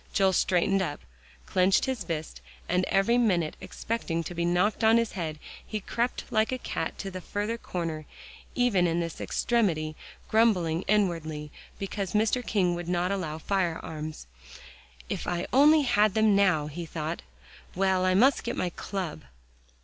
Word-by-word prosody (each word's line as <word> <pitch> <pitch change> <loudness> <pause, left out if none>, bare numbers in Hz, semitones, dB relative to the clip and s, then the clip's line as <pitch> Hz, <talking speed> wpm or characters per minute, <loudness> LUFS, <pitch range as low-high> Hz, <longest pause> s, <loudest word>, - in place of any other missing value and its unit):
Joel 190 -2 +3
straightened 185 +2 +2
up, 150 -6 -3 0.4
clenched 185 +1 +3
his 260 -6 -2
fist, 160 -2 -5 0.3
and 180 +1 +1
every 235 +5 +3
minute 180 -9 +1
expecting 170 -8 -3
to 175 - -6
be 170 0 -1
knocked 180 +6 +1
on 220 +1 +6
the 230 0 +4
head, 165 -7 -5 0.3
he 215 - -4
crept 235 +4 -2
like 220 0 +2
a 255 - -1
cat - - -4
to 195 - -5
the 185 0 -6
further 205 +5 -2
corner, 165 -8 -4 0.5
even 210 -8 +3
in 170 0 0
this 165 -1 -4
extremity, 165 -10 0 0.3
grumbling 180 -8 +3
inwardly 165 -7 0 0.3
because 195 -1 -4
Mr. 220 +4 +2
King 185 -6 +1
would 175 0 -5
not 180 +1 +1
allow 170 -6 -2
firearms. 160 - -3 0.8
"If - - -4
I 175 0 -1
only 300 +3 +6
had 215 -5 +3
them 220 -2 +4
now!" 185 -7 +3
he 165 +3 -6
thought. 155 -1 -4 0.5
"Well, 190 0 +2
I 185 0 +3
must 255 +7 +4
get 235 - -3
my 180 - -1
club." 180 - -5
185 Hz, 155 wpm, -28 LUFS, 170-215 Hz, 0.8 s, on